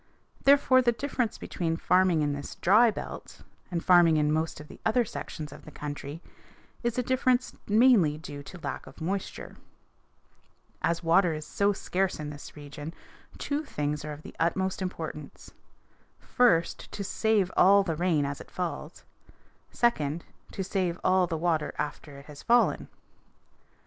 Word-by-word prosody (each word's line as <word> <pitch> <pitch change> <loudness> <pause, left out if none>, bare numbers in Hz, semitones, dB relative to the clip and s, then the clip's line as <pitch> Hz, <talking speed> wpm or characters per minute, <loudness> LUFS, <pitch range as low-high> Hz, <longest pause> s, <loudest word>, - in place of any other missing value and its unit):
Therefore 275 -2 +6
the 240 -1 +3
difference 250 -2 -2
between 165 -2 -3
farming 180 -3 +3
in 145 -1 0
this 145 0 -6
dry 215 +6 +5
belt 215 - -7 0.3
and 170 -3 -3
farming 175 -3 +6
in 150 0 +2
most 160 0 -1
of 150 - -10
the - - -13
other 235 +2 +2
sections 155 -8 -7
of - - -13
our - - -9
country 145 +2 -7 0.6
is 235 -1 -1
a 250 - +1
difference 255 0 +1
mainly 210 - +5
due 145 -2 -8
to 160 +6 -11
a - - -16
lack - - -5
of - - -13
moisture. 190 +4 -4 1.2
As 170 +1 0
water 170 +1 +4
is 155 0 -6
so 200 +5 +1
scarce 190 -2 -1
in 150 -1 -5
this 145 0 -11
region 150 +2 -8 0.4
two 290 +2 -2
things 150 - -3
are 150 - -5
of 150 +1 -11
the - - -11
utmost 190 +3 0
importance: 160 -5 -6 0.6
first, 205 -10 +1
to 200 - -4
save 205 -2 +1
all 200 +2 +6
the 165 -4 -2
rain 165 -3 +1
as 140 0 -4
it - - -13
falls; 165 -2 -5 0.7
second, 165 -9 0 0.3
to 195 - -3
save 185 -2 -1
all 185 -1 +3
the 165 -2 -2
water 160 -2 0
after 145 -1 -5
it 140 - -13
has 145 -2 -11
fallen. 240 +1 +3
175 Hz, 160 wpm, -28 LUFS, 150-205 Hz, 1.2 s, Therefore